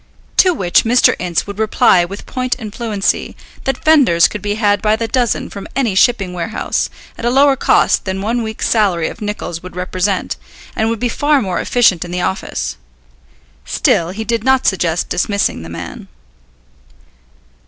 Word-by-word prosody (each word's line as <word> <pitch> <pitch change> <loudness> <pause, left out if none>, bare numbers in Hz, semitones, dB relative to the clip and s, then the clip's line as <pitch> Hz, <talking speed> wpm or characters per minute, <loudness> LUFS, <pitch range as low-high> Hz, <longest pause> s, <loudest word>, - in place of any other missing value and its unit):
To 370 - +6
which 180 - +2
Mr. 245 +2 +4
Ince 175 -2 -1
would 200 0 -8
reply 210 -4 +3
with 200 +4 -9
point 255 0 -2
and 215 -5 -8
fluency 220 -5 -2 0.3
that 270 - -2
fenders 265 - +5
could 210 - -7
be 205 0 -2
had 205 -2 +1
by 215 0 +2
the 225 +1 -3
dozen 245 -2 0
from 200 - -8
any 245 -7 +1
shipping 195 -2 +2
warehouse, 175 +4 -2 0.3
at - - -7
a 240 - +2
lower 275 +2 +4
cost - - +2
than 190 0 -3
one 230 +5 -1
week's 220 -1 -3
salary 190 -7 +1
of - - -11
Nicol's 205 -5 -4
would 185 -1 -10
represent, 185 +1 -2 0.4
and 220 +1 0
would 230 - -1
be 245 - 0
far 290 +4 +2
more 190 -7 -2
efficient 225 -8 +2
in 175 - -9
the 180 +1 -2
office. 65 - -3 0.9
Still 170 0 +1
he 205 +5 -5
did 230 0 -1
not 265 0 +2
suggest 175 -3 0
dismissing 200 - -1
the 80 - -9
man. 85 0 -8
205 Hz, 175 wpm, -16 LUFS, 180-235 Hz, 0.9 s, To